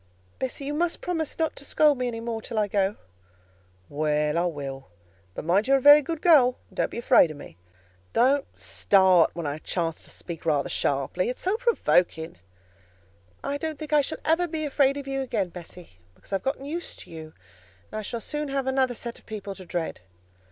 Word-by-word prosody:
"Bessie, 260 Hz, +2 st, -3 dB
you 290 Hz, -, -2 dB
must 335 Hz, +2 st, 0 dB
promise 325 Hz, -4 st, -3 dB
not 320 Hz, -1 st, 0 dB
to -, -, -8 dB
scold 290 Hz, -1 st, +3 dB
me 250 Hz, -, 0 dB
any 230 Hz, -2 st, -4 dB
more 230 Hz, -1 st, -4 dB
till 230 Hz, 0 st, -6 dB
I 210 Hz, -1 st, +2 dB
go." 200 Hz, 0 st, +1 dB, 0.9 s
"Well, 150 Hz, +1 st, 0 dB
I 170 Hz, +1 st, +2 dB
will; 140 Hz, -5 st, -5 dB, 0.5 s
but -, -, -6 dB
mind 190 Hz, +7 st, +2 dB
you 275 Hz, -, +5 dB
are -, -, +5 dB
a -, -, 0 dB
very 290 Hz, +3 st, +9 dB
good 320 Hz, +2 st, -5 dB
girl, 270 Hz, -8 st, +6 dB
and -, -, -19 dB
don't -, -, +1 dB
be -, -, -8 dB
afraid 235 Hz, -7 st, +5 dB
of 155 Hz, -, -8 dB
me. 145 Hz, -, -11 dB, 0.6 s
Don't 270 Hz, +4 st, +3 dB
start 190 Hz, -4 st, +4 dB
when 170 Hz, -2 st, -4 dB
I 145 Hz, +1 st, -3 dB
chance 165 Hz, -1 st, -2 dB
to -, -, -12 dB
speak 170 Hz, -2 st, -7 dB
rather 150 Hz, -4 st, +1 dB
sharply; 140 Hz, -, 0 dB
it's 250 Hz, -, -5 dB
so 380 Hz, +3 st, +1 dB
provoking." 180 Hz, -, +1 dB, 1.1 s
"I 285 Hz, +1 st, -2 dB
don't 315 Hz, -1 st, -3 dB
think 305 Hz, +1 st, -6 dB
I 300 Hz, -, +6 dB
shall 300 Hz, -, -4 dB
ever 330 Hz, +3 st, +2 dB
be 310 Hz, -2 st, -3 dB
afraid 275 Hz, -1 st, +2 dB
of 280 Hz, -1 st, -6 dB
you 270 Hz, 0 st, -1 dB
again, 240 Hz, -8 st, -1 dB
Bessie, 170 Hz, -, -12 dB, 0.2 s
because -, -, -12 dB
I -, -, +3 dB
have -, -, -14 dB
got 270 Hz, +2 st, -1 dB
used 305 Hz, +6 st, -5 dB
to -, -, -13 dB
you, 160 Hz, -1 st, -9 dB, 0.6 s
and 215 Hz, -, -4 dB
I -, -, -3 dB
shall 230 Hz, +2 st, -5 dB
soon 300 Hz, +3 st, -4 dB
have 275 Hz, -1 st, -1 dB
another 265 Hz, -2 st, +1 dB
set 235 Hz, 0 st, -6 dB
of -, -, -28 dB
people 205 Hz, -2 st, -6 dB
to 190 Hz, -1 st, -11 dB
dread." 170 Hz, -1 st, -3 dB
235 Hz, 210 wpm, -26 LUFS, 170-285 Hz, 1.1 s, very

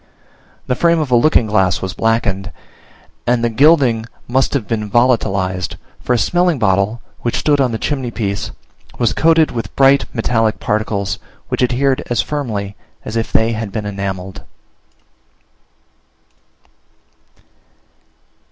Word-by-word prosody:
The -, -, 0 dB
frame 170 Hz, +6 st, +3 dB
of 150 Hz, -5 st, -2 dB
a -, -, +5 dB
looking 120 Hz, 0 st, +4 dB
glass 95 Hz, -4 st, +2 dB
was 95 Hz, 0 st, -4 dB
blackened, 100 Hz, -4 st, 0 dB, 0.8 s
and 120 Hz, -1 st, +2 dB
the 120 Hz, -, +1 dB
gilding 130 Hz, -4 st, +4 dB, 0.2 s
must 130 Hz, +3 st, +1 dB
have 115 Hz, -7 st, -2 dB
been 105 Hz, -2 st, -2 dB
volatilized, 100 Hz, -6 st, +1 dB, 0.2 s
for 125 Hz, -, -1 dB
a -, -, +3 dB
smelling 175 Hz, +4 st, +2 dB
bottle, 105 Hz, +1 st, +1 dB, 0.2 s
which 120 Hz, -, -2 dB
stood 145 Hz, -2 st, +2 dB
on 130 Hz, -2 st, +1 dB
the 110 Hz, -, -2 dB
chimney 130 Hz, -1 st, -2 dB
piece, 100 Hz, -4 st, -3 dB, 0.5 s
was 120 Hz, -, +1 dB
coated 160 Hz, -1 st, +3 dB
with 115 Hz, -5 st, -5 dB
bright 135 Hz, 0 st, +4 dB
metallic 115 Hz, -2 st, 0 dB
particles, 105 Hz, -2 st, -2 dB, 0.3 s
which -, -, -2 dB
adhered 130 Hz, +2 st, +1 dB
as 120 Hz, -2 st, 0 dB
firmly 110 Hz, -9 st, -3 dB, 0.3 s
as 110 Hz, -, -5 dB
if 115 Hz, 0 st, -2 dB
they 110 Hz, +1 st, +2 dB
had 110 Hz, -2 st, -4 dB
been 105 Hz, 0 st, -4 dB
enamelled. 95 Hz, -2 st, -5 dB
115 Hz, 135 wpm, -17 LUFS, 100-130 Hz, 0.8 s, a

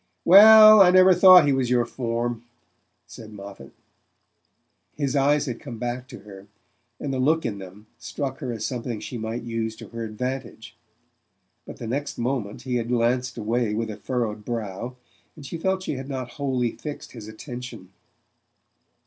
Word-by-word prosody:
"Well, 215 Hz, +3 st, +9 dB
I 185 Hz, -, +7 dB
never 185 Hz, +1 st, +6 dB
thought 180 Hz, -2 st, +8 dB
he 140 Hz, -, +2 dB
was 130 Hz, -2 st, -1 dB
your 120 Hz, -1 st, +2 dB
form," 120 Hz, -1 st, -3 dB, 0.6 s
said 110 Hz, -1 st, -12 dB
Moffatt. 100 Hz, -9 st, -11 dB, 1.2 s
His 140 Hz, -2 st, -2 dB
eyes 145 Hz, +1 st, +2 dB
had 120 Hz, -4 st, -5 dB
come 120 Hz, -, -9 dB
back 120 Hz, +2 st, -5 dB
to 130 Hz, -, -12 dB
her, 100 Hz, -1 st, -13 dB, 0.5 s
and 140 Hz, -, -4 dB
the 130 Hz, -, -2 dB
look 155 Hz, +5 st, +1 dB
in 100 Hz, -2 st, -4 dB
them 95 Hz, +3 st, -12 dB
struck 135 Hz, +3 st, -5 dB
her 130 Hz, -5 st, -5 dB
as 110 Hz, -2 st, -5 dB
something 120 Hz, -3 st, -4 dB
she 120 Hz, -, -7 dB
might 110 Hz, +2 st, -5 dB
use 115 Hz, -1 st, -4 dB
to -, -, -12 dB
her 115 Hz, 0 st, -6 dB
advantage; 115 Hz, 0 st, -6 dB, 0.9 s
but -, -, -10 dB
the 120 Hz, -, -8 dB
next 140 Hz, +6 st, -4 dB
moment 120 Hz, -4 st, -3 dB
he 125 Hz, -2 st, -2 dB
had 115 Hz, -1 st, -3 dB
glanced 125 Hz, +1 st, 0 dB
away 115 Hz, 0 st, -1 dB
with 110 Hz, 0 st, -3 dB
a -, -, -7 dB
furrowed 115 Hz, -4 st, -4 dB
brow, 115 Hz, +1 st, -5 dB, 0.4 s
and 150 Hz, -, -12 dB
she 160 Hz, +5 st, -7 dB
felt 190 Hz, +2 st, -1 dB
she -, -, -3 dB
had 135 Hz, +1 st, -8 dB
not 130 Hz, -3 st, -5 dB
wholly 130 Hz, -4 st, -2 dB
fixed 150 Hz, -1 st, -9 dB
his 110 Hz, -4 st, -11 dB
attention. 120 Hz, -3 st, -9 dB
120 Hz, 170 wpm, -24 LUFS, 110-140 Hz, 1.2 s, Well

